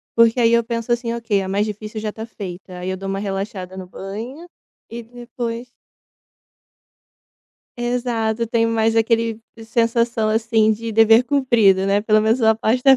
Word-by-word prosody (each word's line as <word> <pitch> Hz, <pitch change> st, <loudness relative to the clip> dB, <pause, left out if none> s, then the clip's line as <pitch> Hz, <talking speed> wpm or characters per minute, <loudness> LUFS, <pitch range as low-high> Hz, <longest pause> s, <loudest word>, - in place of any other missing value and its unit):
porque 230 Hz, +1 st, +4 dB
aí 230 Hz, -1 st, +4 dB
eu 235 Hz, 0 st, +4 dB
penso 230 Hz, 0 st, -4 dB
assim: 235 Hz, -1 st, 0 dB
"Ok, 225 Hz, -4 st, -1 dB
a 190 Hz, -, -5 dB
mais 200 Hz, +2 st, +1 dB
difícil 215 Hz, +1 st, -6 dB
já 215 Hz, 0 st, -3 dB
tá 220 Hz, -, -7 dB
feita". 185 Hz, -4 st, -9 dB
Aí 180 Hz, +1 st, -4 dB
eu 190 Hz, -, -3 dB
dou 195 Hz, +1 st, -6 dB
uma 195 Hz, 0 st, -2 dB
relaxada 195 Hz, -2 st, -5 dB
no 190 Hz, -, -7 dB
banho 225 Hz, -, -8 dB, 0.4 s
e 235 Hz, +1 st, -7 dB
depois 240 Hz, 0 st, -6 dB, 2.1 s
Exato, 240 Hz, -2 st, -1 dB
tenho 230 Hz, 0 st, +1 dB
mais 225 Hz, 0 st, +1 dB
aquele 225 Hz, 0 st, +1 dB, 0.2 s
sensação 230 Hz, 0 st, +1 dB
assim 220 Hz, 0 st, +2 dB
de 225 Hz, +1 st, -5 dB
dever 225 Hz, +2 st, +6 dB
cumprido, 235 Hz, -9 st, +3 dB
né. 200 Hz, +1 st, +2 dB
Pelo 215 Hz, 0 st, +3 dB
menos 220 Hz, +3 st, +2 dB
minha 220 Hz, -2 st, +4 dB
parte 225 Hz, +3 st, 0 dB
tá 270 Hz, 0 st, +7 dB
225 Hz, 165 wpm, -20 LUFS, 210-235 Hz, 2.1 s, tá